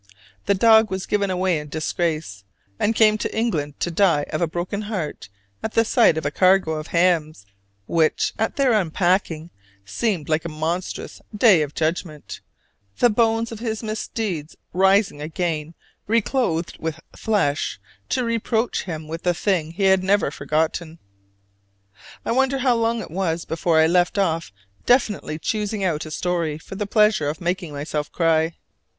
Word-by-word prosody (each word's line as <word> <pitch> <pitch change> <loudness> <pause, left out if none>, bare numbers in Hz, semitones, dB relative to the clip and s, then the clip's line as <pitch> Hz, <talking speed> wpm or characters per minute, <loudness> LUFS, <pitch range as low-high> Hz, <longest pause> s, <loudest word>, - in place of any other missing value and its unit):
The 200 - +3
dog 220 +2 +5
was 190 0 -3
given 200 -1 0
away 185 -3 +1
in 150 0 -9
disgrace, 155 - -2 0.4
and 225 +2 +1
came 215 -1 +4
to - - -3
England 155 -11 -1
to 175 - 0
die 170 -4 +3
of - - -1
a 170 - +2
broken 175 +5 -3
heart 170 - -4 0.3
at 220 - -4
the 225 - +3
sight 225 -8 +4
of 160 - -3
a 145 - 0
cargo 185 -1 +3
of 155 -1 -4
hams, 165 - +1 0.4
which, 160 +4 +1
at 220 - 0
their 270 -4 +3
unpacking, 175 -3 0 0.3
seemed 175 - -2
like 155 0 +1
a 170 - -4
monstrous 160 +4 -4 0.2
day 205 -7 +6
of 150 -1 -3
judgment 160 -1 -3 0.6
the 240 - +4
bones 225 +1 +1
of 225 - -7
his 220 -1 -3
misdeeds 215 -7 -4 0.2
rising 190 -3 +3
again 160 0 -3 0.3
reclothed 220 -6 0
with 160 -1 -4 0.2
flesh 190 - 0 0.3
to 255 - 0
reproach 230 0 -1
him 160 -4 -6
with 165 +2 -5
the 175 -1 +1
thing 175 -4 0
he 195 +3 -3
had 190 -1 +4
never 195 -6 +2
forgotten. 155 +3 -2 1.3
I - - -1
wonder 265 +2 +2
how 260 -1 +2
long 230 0 0
it - - -9
was 170 -2 -1
before 165 0 0
I 160 - +6
left 175 +3 +2
off 165 - 0 0.4
definitely 220 -10 +2
choosing 210 +3 -2
out 160 -4 -1
a - - -7
story 165 -1 -1
for 160 - -11
the 205 +1 -3
pleasure 210 -8 +3
of 155 - -5
making 175 -1 -2
myself 145 +1 -4
cry! 165 -1 +1
180 Hz, 160 wpm, -22 LUFS, 160-215 Hz, 1.3 s, day